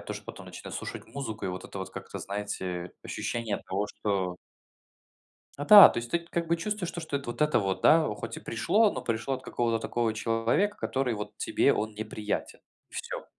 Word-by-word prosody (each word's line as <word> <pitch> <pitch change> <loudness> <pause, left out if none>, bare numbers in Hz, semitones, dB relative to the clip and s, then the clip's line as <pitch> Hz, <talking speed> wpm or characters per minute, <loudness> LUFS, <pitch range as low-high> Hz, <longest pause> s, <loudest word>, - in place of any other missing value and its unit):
тоже - - -6
потом - - -10
начинаю - - -9
слушать - - -6
музыку, 130 -6 -5
и 95 - 0
вот 90 0 -5
это 95 - -8
вот 95 - -5
как-то, - - -7
знаете, 95 -3 -4
ощущение 115 -3 -2
того, 100 +2 -2
что 95 -4 -2 1.2
Да-да, 200 +7 +11
то - - -5
есть 120 0 -3
ты 170 - +2
как 170 0 -3
бы 170 - +3
чувствуешь, 195 +1 -3
то 170 - -5
что 155 -3 -2
это 140 -3 -7
вот 150 - -8
это 150 -6 +4
вот, 95 -2 -1
да, 160 -1 +6
хоть 115 +1 -6
и - - -5
пришло, 200 - +2
но - - -4
пришло 115 +3 -1
от 130 - -5
какого-то 115 -2 0
такого 115 -1 -1
человека, 115 - +1
который 130 -2 -1
вот 105 -1 -6
тебе - - +3
он 110 0 -2
неприятен, 110 0 -4 0.3
и - - -23
всё. - - -5
115 Hz, 195 wpm, -29 LUFS, 105-150 Hz, 1.2 s, Да-да